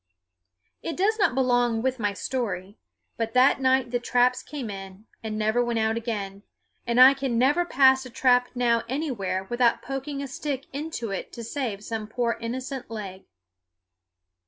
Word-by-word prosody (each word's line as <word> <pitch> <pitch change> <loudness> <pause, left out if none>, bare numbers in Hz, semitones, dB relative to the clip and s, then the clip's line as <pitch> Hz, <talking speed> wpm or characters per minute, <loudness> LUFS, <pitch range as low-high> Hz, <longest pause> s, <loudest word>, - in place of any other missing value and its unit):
It 330 - -4
does 430 +4 +1
not 400 -11 +3
belong 245 -3 +2
with 260 -1 0
my 205 -2 0
story, 200 -4 -3 0.4
but 225 +1 -3
that 260 +2 +5
night 260 -2 +2
the 245 - 0
traps 245 +1 +2
came 270 -7 -6
in, 195 +1 -9 0.2
and 215 -1 -4
never 220 +3 +2
went 240 -1 -1
out 220 0 +1
again; 205 -4 -4 0.5
and 235 +1 +2
I 260 +2 +10
can 270 -3 -2
never 290 +8 +3
pass 265 -4 +4
a 255 - -9
trap 250 0 +3
now 235 -2 +2
anywhere 225 -10 -2
without 240 +3 +1
poking 275 +2 -4
a - - -5
stick 275 0 -4
into 280 -7 -4
it 195 - -5
to 235 - -7
save 230 -4 -4
some 220 -1 -4
poor 235 +1 -1
innocent 255 +3 -5
leg. 200 -4 -7
245 Hz, 165 wpm, -26 LUFS, 220-265 Hz, 0.5 s, I